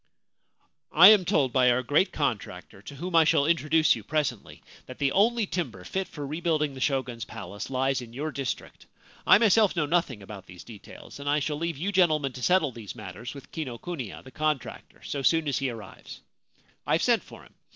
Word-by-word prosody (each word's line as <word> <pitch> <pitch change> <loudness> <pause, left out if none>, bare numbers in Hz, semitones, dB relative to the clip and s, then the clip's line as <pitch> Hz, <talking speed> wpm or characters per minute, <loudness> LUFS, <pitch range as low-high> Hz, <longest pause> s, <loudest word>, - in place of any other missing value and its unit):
' - - -42 0.3
I 175 +5 +9
am 210 -4 +6
told 145 -9 +1
by 125 -1 +4
our 125 +1 +2
great 145 +9 +2
contractor, 105 -9 -4
to 140 - -10
whom 175 +5 -5
I 165 - +7
shall 155 -2 +3
introduce 160 -1 +3
you - - -9
presently, 145 -8 -3 0.2
that 130 - -10
the 140 -1 0
only 225 +5 +2
timber 130 - -4
fit 190 - -3
for 145 -2 -7
rebuilding 155 -1 -1
the 130 - -9
Shogun's 130 -4 -1
palace 105 -2 -8
lies 135 0 0
in 120 -2 -10
your 145 +6 -4
district. 135 -5 -6 0.4
I - - +8
myself 215 -2 +3
know 165 -3 +1
nothing 145 - -1
about 100 -1 -10
these 90 0 -12
details, 110 +4 -12
and 140 0 -4
I 145 - +3
shall 150 0 -2
leave 165 -1 -3
you 185 +7 -2
gentle 175 -5 +4
men 135 -3 -4
to 125 - -9
settle 170 -2 +2
these 110 -4 -9
matters 105 +5 -8
with 135 -2 -12
Kinokuniya, 130 - -6
the 130 - -13
con 155 +3 0
tractor, - - -13
so 140 - -4
soon 160 +3 +2
as 140 - 0
he 135 -2 -1
arrives. 110 -5 -10 0.7
I - - +1
have - - +2
sent - - +3
for - - -14
him. - - -20
140 Hz, 210 wpm, -27 LUFS, 125-165 Hz, 0.7 s, I